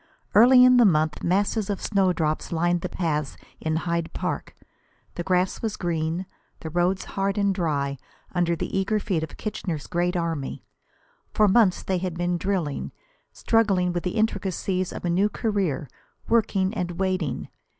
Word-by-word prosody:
Early 250 +3 +8
in 255 0 +6
the 245 - +7
month 155 -6 +2
masses 200 +3 +1
of 200 - -1
snowdrops 180 -6 0
lined 175 +1 +1
the 180 - -3
paths 150 -5 -2 0.2
in 160 0 -1
Hyde 170 0 -1
Park. - - -4 0.6
The - - -4
grass 180 +1 0
was 220 -3 -2
green, 165 +1 -2 0.4
the 160 - -6
roads 175 +3 +1
hard 195 0 -2
and 200 -1 +2
dry 140 -7 -1 0.3
under 175 -1 +1
the 165 - -4
eager 195 +3 +1
feet 185 -5 -1
of 160 - -6
Kitchener's 175 -8 -4
great 175 +1 0
army. 165 -5 -3 0.7
For 215 - +5
months 200 -2 +4
they 185 -1 -1
had 180 -2 -3
been 175 0 0
drilling, 180 -7 -2 0.4
struggling 195 -6 +2
with 175 - -1
the 180 +3 -3
intricacies 190 -3 -1
of - - -7
a - - +1
new 195 +4 +2
career, 195 - -1 0.4
working 205 -4 +2
and 180 -5 -3
waiting. 185 -7 -1
180 Hz, 160 wpm, -25 LUFS, 170-200 Hz, 0.7 s, Early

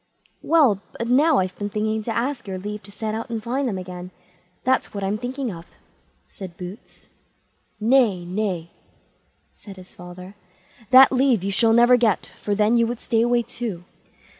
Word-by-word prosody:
"Well, 275 - +3 0.2
but 235 - -3
now 290 +4 +4
I've 185 0 -1
been 205 0 -3
thinking 215 +1 -1
to 225 - -4
ask 255 0 -2
your 190 -1 -4
leave 210 +2 -6
to 200 - -14
set 215 +1 -4
out 225 +3 -5
and 225 -2 -4
find 260 +4 -1
them 205 -5 -2
again; 180 -1 -7 0.5
that's 260 -4 0
what 200 - -3
I'm 200 +2 -1
thinking 255 0 -4
of", 170 -1 -10 0.6
said 185 -3 -10
Boots. 180 +5 -11 0.7
"Nay, 220 -6 +3
nay!" 180 -3 -3 0.8
said 200 -2 -13
his 185 0 -14
father; 180 +2 -11 0.6
"that 265 +1 +8
leave 255 -6 +2
you 200 - -1
shall 225 +3 +3
never 240 +2 +6
get, 225 -5 0
for 205 - -1
then 215 +3 +3
you 230 -1 +3
would 240 0 -4
stay 225 -2 0
away 240 0 +2
too." 220 -8 -6
215 Hz, 175 wpm, -22 LUFS, 190-240 Hz, 0.8 s, that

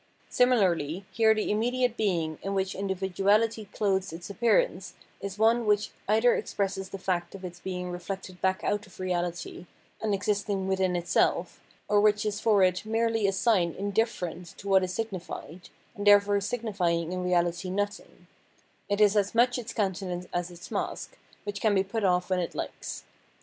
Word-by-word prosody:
Similarly 190 - +2
here 220 +2 +4
the 215 - -1
immediate 245 +3 +1
being 170 -8 -1
in 195 0 -3
which 190 -1 0
individuality 200 +3 +1
clothes 195 -2 -1
its 175 +4 -8
appearance 240 - +1 0.3
is 200 0 -5
one 225 +1 +3
which 210 0 +2 0.2
either 225 +4 +4
expresses 195 -1 -2
the - - -6
fact 180 -1 -2
of 190 -1 -8
its 175 -1 -8
being 180 -1 -4
reflected 180 +1 -6
back 190 0 +1
out 205 +1 -1
of 185 - -17
reahty 175 -1 -3 0.3
and 220 - 0
existing 200 -1 -1
within 190 -1 +1
itself, 175 0 +1 0.3
or 205 -1 +4
which 210 0 +3
is 210 -1 -1
for 210 -4 +4
it 180 -1 +2
merely 225 -1 +1
a - - +2
sign 190 -4 +2
indifferent 190 -4 -2
to 200 - -9
what 190 -1 +5
is 180 - -2
signified, 185 -4 -6 0.2
and 205 -2 -4
therefore 205 0 +6
signifying 195 -7 -1
in 180 0 -3
reahty 175 0 0
nothing; 205 +2 -4 0.6
it 205 0 0
is 210 -1 +5
as 205 +1 +1
much 245 +2 +4
its 240 0 -6
countenance 190 -4 -2
as 175 0 -1
its 175 0 -12
mask, - - -3 0.3
which 205 -1 -5
can 215 -2 +3
be 190 - +3
put 215 +3 -3
off 180 -1 +2
when 185 - +2
it 175 - -3
likes. - - -5
195 Hz, 170 wpm, -28 LUFS, 180-215 Hz, 0.6 s, therefore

